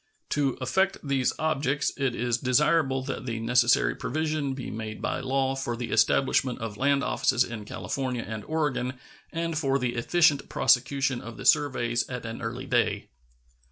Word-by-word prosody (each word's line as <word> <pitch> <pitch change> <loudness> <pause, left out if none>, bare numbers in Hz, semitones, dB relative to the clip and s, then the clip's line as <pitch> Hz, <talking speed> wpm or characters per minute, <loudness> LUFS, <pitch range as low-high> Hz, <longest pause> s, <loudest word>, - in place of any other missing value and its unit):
To 140 -3 0
effect 190 +9 +1
these 135 -3 +1
objects 150 -2 0
it 135 -3 -1
is 120 -1 0
desirable 135 +1 +2
that 130 -1 -5
the 115 -2 -2
necessary 120 +1 +3
provision 155 -1 -2
be 130 - -6
made 110 -1 -6
by - - -2
law 135 0 0
for 120 -3 -3
the 120 -1 -5
establishment 130 +2 +2
of 110 -2 -5
land 140 +3 +2
offices 130 0 +2
in 110 -4 -7
California 125 +2 -3
and 110 -1 -5
Oregon 145 -5 -1 0.4
and 165 0 -2
for 135 -3 +1
the 125 -3 -1
efficient 145 +4 +2
prosecution 130 0 +2
of 115 -1 -9
the - - -8
surveys 120 -5 +2
at 125 -2 -5
an 115 0 -6
early 120 +3 -4
day. 120 -2 0
130 Hz, 160 wpm, -27 LUFS, 120-140 Hz, 0.4 s, necessary